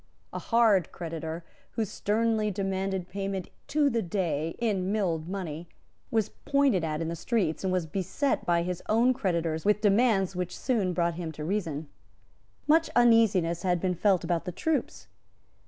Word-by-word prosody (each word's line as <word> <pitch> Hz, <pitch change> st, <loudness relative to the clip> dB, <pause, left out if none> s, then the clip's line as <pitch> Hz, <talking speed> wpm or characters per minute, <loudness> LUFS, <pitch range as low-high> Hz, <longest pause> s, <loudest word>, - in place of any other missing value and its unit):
A -, -, -3 dB
hard 220 Hz, -7 st, +3 dB
creditor, 165 Hz, -1 st, -5 dB, 0.3 s
who 225 Hz, -, 0 dB
sternly 215 Hz, +2 st, 0 dB
demanded 190 Hz, -2 st, -2 dB
payment 195 Hz, -1 st, -4 dB, 0.2 s
to 295 Hz, -1 st, +2 dB
the 235 Hz, -4 st, +1 dB
day 165 Hz, -4 st, -2 dB
in 200 Hz, -5 st, 0 dB
milled 175 Hz, -6 st, -1 dB
money, 170 Hz, -4 st, -5 dB, 0.4 s
was 220 Hz, -3 st, +1 dB
pointed 275 Hz, -, +1 dB
at 155 Hz, 0 st, -2 dB
in -, -, -3 dB
the 165 Hz, -, -3 dB
streets, 185 Hz, -3 st, -1 dB
and 190 Hz, -, 0 dB
was 180 Hz, -2 st, 0 dB
beset 195 Hz, -, -1 dB
by 170 Hz, -1 st, +2 dB
his 180 Hz, 0 st, -3 dB
own 235 Hz, +4 st, +4 dB
creditors 170 Hz, -8 st, -1 dB
with 210 Hz, 0 st, +3 dB
demands 205 Hz, -3 st, +3 dB
which 180 Hz, 0 st, -3 dB
soon 210 Hz, -8 st, 0 dB
brought 170 Hz, -1 st, +1 dB
him 165 Hz, -2 st, -4 dB
to 150 Hz, -, -7 dB
reason. 160 Hz, -5 st, -2 dB, 0.8 s
Much 320 Hz, +2 st, +4 dB
uneasiness 220 Hz, -8 st, +4 dB
had 180 Hz, -2 st, +1 dB
been 185 Hz, +1 st, 0 dB
felt 190 Hz, +1 st, +2 dB
about 170 Hz, -2 st, -1 dB
the 180 Hz, -, -3 dB
troops. 315 Hz, -, -2 dB
190 Hz, 160 wpm, -28 LUFS, 170-220 Hz, 0.8 s, own